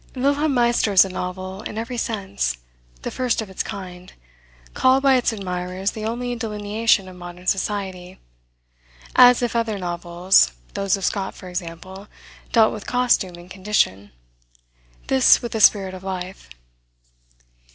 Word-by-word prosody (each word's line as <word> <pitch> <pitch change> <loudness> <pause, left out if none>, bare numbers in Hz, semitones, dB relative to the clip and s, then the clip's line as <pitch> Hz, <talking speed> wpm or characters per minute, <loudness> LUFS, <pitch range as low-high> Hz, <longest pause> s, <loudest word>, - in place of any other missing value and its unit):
Wilhelm 280 +2 +1
Meister 235 -3 +2
is 190 -1 +7
a - - -6
novel 185 +1 -5
in 215 - -7
every 230 +2 -4
sense, 200 - -2 0.5
the - - -4
first 255 -2 -1
of 215 -4 -5
its 190 - -3
kind, 180 -2 -8 0.6
called 260 +1 +3
by 275 -1 +5
its 245 -1 +2
admirers 185 -1 -3
the 215 -1 -6
only 245 +2 -3
delineation 210 -2 0
of 185 - -11
modern 175 0 -10
society, 190 -2 -3 1.0
as 250 0 +7
if 240 -1 -1
other 225 -3 0
novels, 175 - +2 0.2
those 195 -1 0
of 195 - -3
Scott, 195 -2 -2
for 185 - -10
example, 180 +3 -7 0.4
dealt 225 -2 +4
with 210 - -8
costume 245 -7 +1
and 175 +1 -14
condition, 185 - 0 0.9
this 130 - +5
with 240 - -4
the 220 - -2
spirit 195 -3 +4
of 185 0 -9
life. 185 - -6
195 Hz, 145 wpm, -22 LUFS, 180-230 Hz, 1.0 s, is